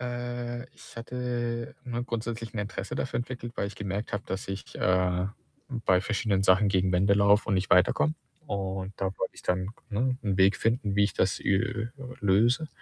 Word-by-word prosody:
Äh, 120 0 -4
ich - - -15
hatte, 120 -1 -3
ne, 120 -2 -2
grundsätzlich 115 -1 -4
'n - - -3
Interesse 100 -1 -4
dafür 130 - -1
entwickelt, 120 -1 -5
weil - - 0
ich 100 0 -8
gemerkt 100 +1 -3
habe, 105 - -1
dass 95 +1 -4
ich, 95 0 -6
äh, 90 0 +2 0.6
bei 90 -1 +5
verschiedenen 100 0 0
Sachen 95 +2 +5
gegen 95 -1 +2
Wände 95 +3 +4
laufe 100 +2 +4
und 100 - +3
nicht 95 0 0
weiterkomme. 95 - +4 0.3
Und 95 -3 -3
da 95 - -1
wollte - - -2
ich - - -12
dann 90 +1 0
k - - -27
ne, 125 +4 +1
'n 100 -4 0
Weg 95 +1 +5
finden, 115 -3 0
wie 100 - +5
ich 100 - -1
das, 95 - +1
äh, - - -3
äh, 115 +2 0 0.3
löse 115 +9 +3
105 Hz, 190 wpm, -28 LUFS, 95-120 Hz, 0.6 s, bei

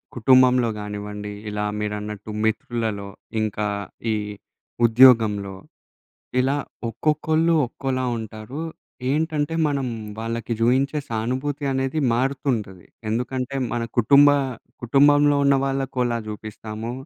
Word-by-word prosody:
కుటుంబంలో 125 0 +5
గానివ్వండి, 105 0 -6 0.2
ఇలా 105 0 -3 0.2
మీరన్నట్టు 105 0 -4 0.2
మిత్రులలో, 110 -2 -2 0.3
ఇంకా 105 0 -1 0.5
ఈ - - +2 0.7
ఉద్యోగంలో, 110 -5 +5 0.9
ఇలా 135 +3 +1 0.3
ఒక్కొక్కళ్ళు 155 +6 +1
ఒక్కోలా 130 +1 -3
ఉంటారు. 110 +6 -7 0.5
ఏంటంటే, 155 +1 0
మనం 140 -2 -1 0.3
వాళ్ళకి 115 +1 -3
జూయించే 135 +5 +2
సానుభూతి 130 +6 -2
అనేది 135 +3 -1
మారుతుంటది. 120 - -2 0.2
ఎందుకంటే, 125 +3 -2 0.2
మన 120 -1 -1 0.2
కుటుంబ 140 +5 +7 0.6
కుటుంబంలో 145 +3 +5
ఉన్న 140 0 +5
వాళ్ళకోలా 130 -3 -1
జూపిస్తాము, 110 +2 -6
125 Hz, 90 wpm, -23 LUFS, 110-140 Hz, 0.9 s, కుటుంబ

